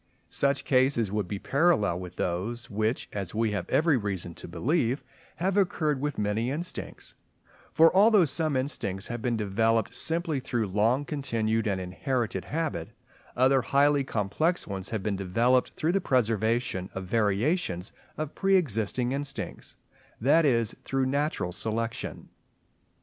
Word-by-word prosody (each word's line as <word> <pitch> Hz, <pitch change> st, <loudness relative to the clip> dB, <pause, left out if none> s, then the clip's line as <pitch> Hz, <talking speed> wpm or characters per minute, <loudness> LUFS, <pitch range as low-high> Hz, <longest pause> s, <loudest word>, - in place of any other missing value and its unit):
Such 140 Hz, 0 st, +1 dB
cases 130 Hz, -5 st, +2 dB
would 105 Hz, -3 st, -1 dB
be 100 Hz, -, -3 dB
parallel 135 Hz, -, +2 dB
with 90 Hz, -1 st, -8 dB
those 115 Hz, +8 st, -3 dB
which, 110 Hz, +3 st, -1 dB
as 100 Hz, -2 st, -4 dB
we 110 Hz, -1 st, +1 dB
have 100 Hz, -4 st, -3 dB
every 155 Hz, -2 st, +3 dB
reason 95 Hz, -6 st, -3 dB
to -, -, -8 dB
believe, 125 Hz, -, 0 dB, 0.3 s
have 190 Hz, +3 st, -1 dB
occurred 155 Hz, -7 st, +1 dB
with 145 Hz, -1 st, -2 dB
many 105 Hz, +3 st, 0 dB
instincts; 165 Hz, +6 st, -4 dB, 0.6 s
for 165 Hz, +2 st, +5 dB
although 205 Hz, -2 st, +6 dB
some 155 Hz, -1 st, 0 dB
instincts 105 Hz, -8 st, -2 dB
have 120 Hz, -1 st, -4 dB
been 120 Hz, -1 st, 0 dB
developed 110 Hz, +2 st, +1 dB
simply 165 Hz, -3 st, -1 dB
through 120 Hz, -5 st, -2 dB
long 115 Hz, +8 st, +2 dB
continued 115 Hz, -7 st, -1 dB
and 100 Hz, -2 st, 0 dB
inherited 115 Hz, +6 st, -2 dB
habit, 150 Hz, -, -3 dB, 0.5 s
other 130 Hz, +1 st, +4 dB
highly 140 Hz, +3 st, +3 dB
complex 135 Hz, -, -1 dB
ones 95 Hz, -1 st, -5 dB
have 110 Hz, -4 st, -3 dB
been 100 Hz, -1 st, -1 dB
developed 115 Hz, +7 st, +2 dB
through 160 Hz, +2 st, 0 dB
the 195 Hz, +2 st, +1 dB
preservation 115 Hz, -, 0 dB
of 95 Hz, 0 st, -4 dB
variations 105 Hz, -, 0 dB, 0.3 s
of 155 Hz, -1 st, -4 dB
pre 195 Hz, 0 st, +2 dB
existing 120 Hz, -, 0 dB
instincts—that 140 Hz, -, -2 dB
is, 115 Hz, -5 st, +2 dB
through 135 Hz, -1 st, 0 dB
natural 140 Hz, -, -1 dB
selection. 115 Hz, +4 st, -3 dB
120 Hz, 140 wpm, -28 LUFS, 105-145 Hz, 0.6 s, although